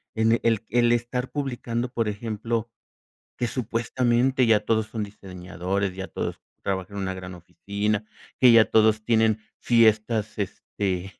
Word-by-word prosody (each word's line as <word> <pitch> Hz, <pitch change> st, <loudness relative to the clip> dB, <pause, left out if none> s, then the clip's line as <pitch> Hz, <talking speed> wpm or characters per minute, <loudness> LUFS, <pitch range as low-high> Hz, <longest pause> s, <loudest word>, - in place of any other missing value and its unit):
en 110 Hz, 0 st, +3 dB
e 115 Hz, -, +3 dB
el 115 Hz, -2 st, +2 dB
el 120 Hz, 0 st, +3 dB
estar 120 Hz, +2 st, -2 dB
publicando, 125 Hz, -4 st, -3 dB
por 115 Hz, -3 st, -1 dB
ejemplo, 115 Hz, +2 st, -3 dB, 0.7 s
que 120 Hz, -, 0 dB
supuestamente, 120 Hz, +2 st, +1 dB
ya 110 Hz, -2 st, +5 dB
todos 110 Hz, 0 st, 0 dB
son 110 Hz, -2 st, -4 dB
diseñadores, 95 Hz, -1 st, -4 dB
ya 95 Hz, 0 st, -5 dB
todos -, -, -4 dB, 0.2 s
trabajan 95 Hz, +1 st, -3 dB
en 100 Hz, -, -2 dB
una 95 Hz, 0 st, -2 dB
gran 90 Hz, 0 st, -8 dB
oficina, 100 Hz, +4 st, -3 dB, 0.4 s
que 125 Hz, -2 st, +8 dB
ya 115 Hz, -1 st, +7 dB
todos 110 Hz, -1 st, +4 dB
tienen 110 Hz, -2 st, +3 dB, 0.2 s
fiestas, 110 Hz, -2 st, +2 dB
este, 95 Hz, -1 st, -3 dB
110 Hz, 145 wpm, -25 LUFS, 100-120 Hz, 0.7 s, que